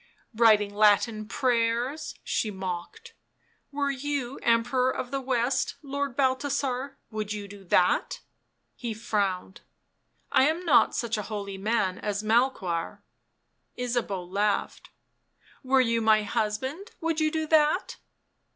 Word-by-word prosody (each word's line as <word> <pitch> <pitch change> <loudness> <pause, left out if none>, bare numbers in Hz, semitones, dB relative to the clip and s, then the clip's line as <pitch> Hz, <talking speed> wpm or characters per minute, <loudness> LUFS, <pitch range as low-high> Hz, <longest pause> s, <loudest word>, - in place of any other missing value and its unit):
" - - -41
Writing 215 -3 +4
Latin 215 +1 +3
prayers," 245 +4 0
she 220 - -1
mocked. 190 - -6 0.3
" - - -41
Were 280 0 0
you 275 -1 -3
Emperor 240 +2 +2
of 250 -1 -4
the 275 -1 -2
West, 255 0 0
Lord 280 -2 -3
Balthasar, 270 0 0
would 215 -1 -3
you 205 -1 -6
do 200 0 -12
that 180 0 +2 0.3
?" - - -49
He 230 -2 -2
frowned. 200 -4 -2 0.4
" - - -48 0.3
I 265 - +5
am 330 +4 -1
not 325 - +4
such 230 -2 -1
a 210 - -6
holy 200 -2 -5
man 195 -3 0
as 205 0 -2
Melchoir." 215 -7 0 0.7
Ysabeau 240 -7 -2
laughed. 200 +3 -1 0.4
" - - -31
Were 265 0 +4
you 230 -2 +1
my 215 -1 +4
husband 260 - -2
would 325 -1 0
you 310 0 +2
do 315 0 -2
that 310 +3 +2
235 Hz, 140 wpm, -27 LUFS, 210-275 Hz, 0.7 s, I